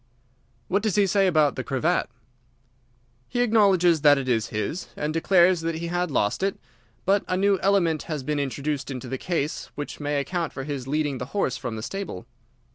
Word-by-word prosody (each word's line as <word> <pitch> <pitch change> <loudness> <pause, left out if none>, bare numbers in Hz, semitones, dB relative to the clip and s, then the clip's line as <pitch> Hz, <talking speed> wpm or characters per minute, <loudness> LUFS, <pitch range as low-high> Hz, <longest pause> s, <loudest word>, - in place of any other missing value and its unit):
"What 200 +7 +1
does 215 -3 0
he 205 - +4
say 195 +1 +3
about 155 -5 +3
the 130 - -3
cravat?" 145 +7 0 1.2
"He 245 - 0
acknowledges 195 -8 +4
that 145 -1 +6
it 135 -1 -3
is 115 -2 +1
his, 110 +11 -3
and 150 +1 -2
declares 175 +1 +4
that 165 0 -2
he 170 +1 -4
had 175 0 -1
lost 105 - 0
it. 195 0 0 0.5
But 200 +1 +3
a 185 - 0
new 195 0 +3
element 175 -6 +2
has 150 -4 -3
been 150 +1 -1
introduced 140 +1 -2
into 130 -1 -5
the 130 +1 -4
case 160 -4 -2
which 145 - -6
may 145 -1 -1
account 165 +3 -2
for 135 - -5
his 135 -3 -5
leading 145 -2 -1
the 125 - -4
horse 130 -10 +1
from 120 -3 -5
the 110 - -6
stable." 190 - -5
155 Hz, 195 wpm, -25 LUFS, 140-185 Hz, 1.2 s, that